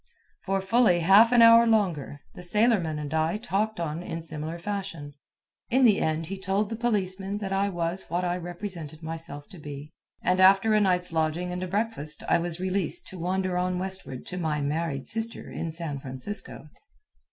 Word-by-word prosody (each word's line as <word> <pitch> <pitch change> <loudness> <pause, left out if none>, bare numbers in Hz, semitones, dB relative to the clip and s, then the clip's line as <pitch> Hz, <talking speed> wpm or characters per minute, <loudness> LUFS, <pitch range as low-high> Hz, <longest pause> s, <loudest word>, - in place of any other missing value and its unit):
For 195 0 0
fully 195 -3 +3
half 200 +7 +7
an 240 -2 +7
hour 230 0 +8
longer, 175 -10 0
the - - -10
sailorman 180 -4 +1
and 150 0 -5
I 160 +4 +1
talked 215 -1 -1
on 165 0 -3
in 165 -2 -5
similar 160 +1 -5
fashion. 170 -6 -5 0.6
In 260 +2 +4
the 210 -4 +4
end 160 +1 0
he 190 +3 -6
told 195 +2 0
the - - -1
policemen 200 -4 -1
that 195 -2 -4
I 200 +1 +1
was 175 0 -2
what 180 +1 -1
I 175 0 0
represented 175 -3 -7
myself 160 -2 -7
to 180 - -12
be, 145 0 -8 0.3
and 185 +1 +2
after 195 +3 +6
a 215 - +4
night's 180 -3 +1
lodging 160 +3 0
and 180 0 -4
a 185 - -3
breakfast 195 -6 -2
I - - +3
was 170 0 -3
released 195 - 0
to 190 - -9
wander 185 +1 -1
on 180 0 0
westward 190 -8 -5
to 180 - -6
my 155 -3 -1
married 145 -1 -2
sister 225 +1 -4
in 165 - -4
San 160 -4 -3
Francisco. 135 +5 -6
180 Hz, 185 wpm, -27 LUFS, 160-200 Hz, 0.6 s, hour